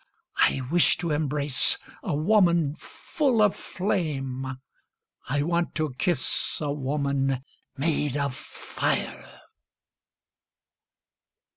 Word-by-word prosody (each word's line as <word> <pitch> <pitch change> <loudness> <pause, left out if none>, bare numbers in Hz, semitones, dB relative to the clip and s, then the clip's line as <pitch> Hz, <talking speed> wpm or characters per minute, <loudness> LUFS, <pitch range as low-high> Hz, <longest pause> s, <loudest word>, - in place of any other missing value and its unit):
I 135 - +4
wish 175 0 +5
to 170 -2 -2
embrace 145 -2 +1 0.2
a - - -2
woman 170 -3 +3
full 270 -7 -1
of 210 -2 +4
flame, 135 -9 -2 0.8
I 145 +2 +1
want 170 +2 0
to 155 -4 -1
kiss 175 +4 0
a 150 -2 -2
woman 140 -2 -1 0.3
made 145 -1 0
of 140 -2 -1
fire. - - -4
150 Hz, 95 wpm, -26 LUFS, 140-170 Hz, 0.8 s, wish